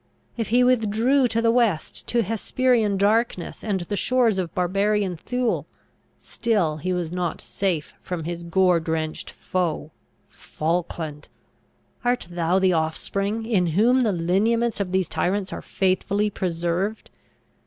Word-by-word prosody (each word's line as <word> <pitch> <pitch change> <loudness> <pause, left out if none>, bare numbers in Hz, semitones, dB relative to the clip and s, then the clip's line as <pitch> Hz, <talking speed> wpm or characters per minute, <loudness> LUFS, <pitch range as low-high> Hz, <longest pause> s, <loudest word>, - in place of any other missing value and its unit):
If 230 -3 -2
he 245 +2 +4
withdrew 250 +2 +3
to 230 0 -1
the 230 - +4
west, 230 -9 0
to 235 -1 +2
Hesperian 225 0 +1
darkness, 210 -1 0
and 200 -4 -1
the 175 +4 -3
shores 235 -3 +2
of 175 -3 -2
barbarian 195 +1 +1
Thule, 245 +7 -2 0.5
still 205 -10 -1
he 180 +5 -3
was 175 -3 -2
not 180 -2 -2
safe 180 -7 -2
from 175 -3 -4
his 170 +1 -4
gore 175 +1 +3
drenched 160 -1 -3
foe. 170 -4 -2 0.4
Falkland! 160 -2 -3 0.8
art 245 0 +1
thou 175 +1 +1
the 190 -1 +3
offspring, 195 +7 -1
in 200 -6 +2
whom 245 +5 +5
the 230 -4 +2
lineaments 210 +7 +1
of 195 -3 -2
these 190 -1 +1
tyrants 190 +1 -1
are - - -5
faithfully 200 +2 0
preserved? 175 +3 -2
195 Hz, 135 wpm, -24 LUFS, 175-225 Hz, 0.8 s, whom